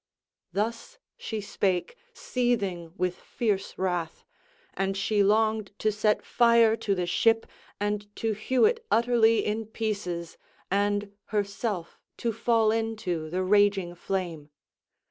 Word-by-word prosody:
Thus 230 - -3 0.2
she 220 -2 -5
spake, 195 - -1 0.2
seething 205 - -1
with 180 -1 0
fierce 205 -5 -2
wrath; 175 -3 -2 0.5
and 195 0 -1
she 205 +1 +1
longed 215 0 +2
to 215 - +1
set 210 0 +1
fire 235 -2 +5
to 200 -3 0
the 180 -1 -1
ship 225 +5 +3 0.3
and 205 0 -1
to 225 - -1
hew 220 +5 +2
it 460 +1 +1
utterly 230 - +4
in 215 +1 -2
pieces, 200 -7 -4 0.3
and 205 +1 +1
herself 205 -3 -3 0.2
to 230 -1 -1
fall 225 -1 +2
into 215 -8 -2
the 185 +3 -1
raging 200 -2 +3
flame. 175 -4 -4
210 Hz, 125 wpm, -27 LUFS, 190-225 Hz, 0.5 s, fire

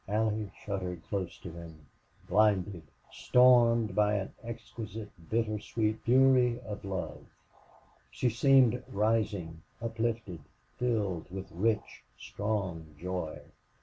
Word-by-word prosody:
Allie 105 0 0 0.2
shuddered 90 -4 -4
close 95 -4 -3
to 85 - -7
him, 80 -2 -11 0.4
blinded, 100 -2 +2 0.3
stormed 120 -4 +5
by 105 +1 +3
an 95 -1 -3
exquisite 115 -2 -7 0.2
bitter 110 -2 0
sweet 110 +1 -1
fury 125 -1 +4
of 105 -4 -7
love. 90 -6 -4 0.9
She 125 - 0
seemed 125 0 +4
rising, 100 -6 0 0.2
uplifted, 115 -5 -2 0.4
filled 105 -9 -1
with 95 +1 -7
rich, 105 +5 -1
strong 95 - -3
joy. 90 -2 -4
105 Hz, 105 wpm, -31 LUFS, 95-115 Hz, 0.9 s, stormed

